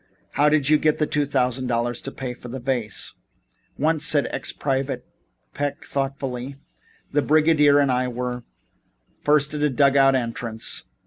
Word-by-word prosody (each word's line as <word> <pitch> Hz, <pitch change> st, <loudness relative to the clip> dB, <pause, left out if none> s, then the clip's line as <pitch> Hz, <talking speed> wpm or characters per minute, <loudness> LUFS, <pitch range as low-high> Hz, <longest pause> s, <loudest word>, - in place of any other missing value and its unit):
How 145 Hz, +2 st, +3 dB
did 150 Hz, -3 st, +2 dB
you 155 Hz, 0 st, +5 dB
get 155 Hz, -1 st, +2 dB
the 155 Hz, -, +1 dB
two 145 Hz, -1 st, 0 dB
thousand 130 Hz, -2 st, 0 dB
dollars 120 Hz, 0 st, -1 dB
to 135 Hz, -, -6 dB
pay 130 Hz, -2 st, -5 dB
for 125 Hz, -, -12 dB
this 125 Hz, +1 st, -7 dB
vase?" 120 Hz, -6 st, -2 dB, 0.6 s
"Once," 155 Hz, +1 st, +1 dB
said 145 Hz, -1 st, +4 dB
ex -, -, -2 dB
Private 135 Hz, 0 st, -2 dB, 0.5 s
Peck 145 Hz, +1 st, -3 dB
thoughtfully, 135 Hz, -1 st, -3 dB, 0.6 s
"the 145 Hz, -, +2 dB
brigadier 150 Hz, -1 st, +4 dB
and 140 Hz, -2 st, +3 dB
I 125 Hz, 0 st, +1 dB
were 125 Hz, 0 st, -4 dB, 0.8 s
first 150 Hz, 0 st, +2 dB
at 150 Hz, -, -3 dB
a 150 Hz, -, +3 dB
dug 140 Hz, +1 st, +3 dB
out 135 Hz, -1 st, +5 dB
entrance. 115 Hz, -2 st, -2 dB
135 Hz, 165 wpm, -23 LUFS, 125-145 Hz, 0.8 s, you